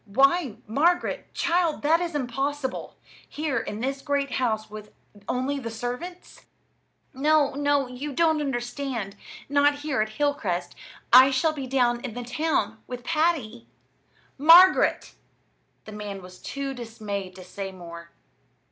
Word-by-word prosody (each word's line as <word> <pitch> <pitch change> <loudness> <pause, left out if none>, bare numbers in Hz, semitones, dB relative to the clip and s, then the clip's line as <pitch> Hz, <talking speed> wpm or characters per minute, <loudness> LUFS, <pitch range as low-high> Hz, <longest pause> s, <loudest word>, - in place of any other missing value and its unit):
Why, 275 - +3
Margaret, 310 +11 0
child, 340 -3 +1
that 320 +3 +4
is 340 -3 -3
impossible! 270 +1 -3 0.3
here 290 -4 -2
in 215 -1 -5
this 270 +2 -2
great 280 -1 -1
house 225 -3 -1
with 210 0 -10 0.4
only 265 +3 -1
the 230 -4 -5
servants?" 245 +11 -7 0.7
"No, 290 +1 +3
no, 285 0 +1
you 255 +4 -6
don't 315 +1 +2
understand; 240 -5 -3 0.3
not 285 +1 +2
here 290 -6 0
at 215 - -1
Hilcrest. 225 -11 -1 0.4
I 260 +2 +10
shall 275 +4 +1
be 275 -4 -5
down 245 -2 +2
in 245 -4 -6
the 245 - -4
town 245 -4 -1
with 250 -1 -7
Patty." 305 -8 0 0.7
"Margaret!" 340 +6 +6 0.7
The 215 - -9
man 205 -2 -7
was 180 0 -13
too 275 -1 -4
dismayed 210 -6 -6
to 185 - -10
say 195 +1 -6
more. 170 -2 -10
265 Hz, 135 wpm, -25 LUFS, 220-290 Hz, 0.7 s, I